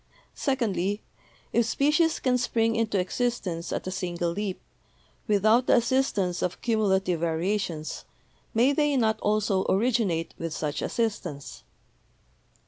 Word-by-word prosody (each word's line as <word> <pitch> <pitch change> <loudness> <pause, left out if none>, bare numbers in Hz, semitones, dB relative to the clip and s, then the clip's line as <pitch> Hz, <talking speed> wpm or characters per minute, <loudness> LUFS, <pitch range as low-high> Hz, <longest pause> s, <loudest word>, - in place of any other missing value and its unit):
Secondly, 210 -7 -1 0.5
if 235 -1 +3
species 305 +6 +2
can 255 -1 +2
spring 230 -2 +1
into 225 -2 0
exist 240 +6 -1
ence 170 -1 -4
at - - -3
a 185 - -3
single 175 -2 -2
leap, 195 +1 -3 0.7
without 215 +4 +3
the - - +6
assistance 235 -7 +1
of 180 - -2
cumulative 190 -6 +1
variations, 170 0 -2 0.5
may 245 +5 +3
they 295 -1 +2
not 220 -3 +2
also 210 -2 +1
originate 200 -6 +1
with 165 -2 -4
such 150 -2 -2
assist 225 -3 -1
ance? 140 -1 -9
210 Hz, 130 wpm, -27 LUFS, 180-235 Hz, 0.7 s, the